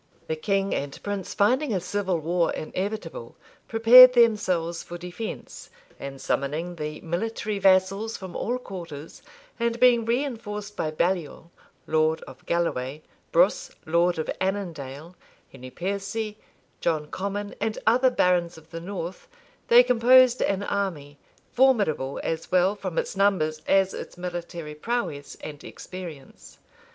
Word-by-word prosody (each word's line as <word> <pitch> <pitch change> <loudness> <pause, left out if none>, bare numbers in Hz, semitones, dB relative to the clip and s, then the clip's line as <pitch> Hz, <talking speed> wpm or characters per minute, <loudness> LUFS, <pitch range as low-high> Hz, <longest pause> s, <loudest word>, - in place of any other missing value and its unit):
The 160 - -2
king 195 +4 0
and 140 0 -4
prince, 200 -2 -4
finding 255 +7 +2
a - - +1
civil 185 0 -1
war 170 +2 0
inevitable, 185 - -5 0.3
prepared 245 +3 +9
themselves 190 -8 +2
for 175 - -8
defence; 180 +5 -7 0.3
and 135 0 -7
summoning 160 +8 -2
the 150 0 -5
military 210 +4 -3
vassals 195 +3 +3
from 185 -2 -9
all 245 +3 -1
quarters, 170 - -9 0.4
and 235 0 0
being 245 -2 +5
reinforced 225 -5 -3
by 155 - -1
Baliol, 170 0 -2 0.3
lord 155 0 +1
of - - -13
Galloway, 155 -4 -1 0.3
Brus, - - +3 0.2
lord 170 +2 +2
of 160 - -2
Annandale, 170 -5 -4 0.4
Henry 130 -1 -10
Piercy, 200 - -4 0.4
John 155 -3 0
Comyn,[*] 200 +5 -4
and 220 0 -1
other 255 +3 +4
barons 175 -7 +1
of 160 0 -17
the 165 0 -6
north, 185 - -6 0.4
they 240 +1 +8
composed 250 +1 +5
an 195 0 0
army, 165 -9 -3 0.3
formidable 205 - +2
as 165 0 -3
well 185 +2 +3
from 185 -4 -6
its - - -1
numbers 185 -6 +1
as 195 -1 +3
its - - -8
military 175 -3 -6
prowess 150 - -3
and 150 -1 -8
experience. 170 -7 -10
185 Hz, 130 wpm, -25 LUFS, 160-215 Hz, 0.4 s, prepared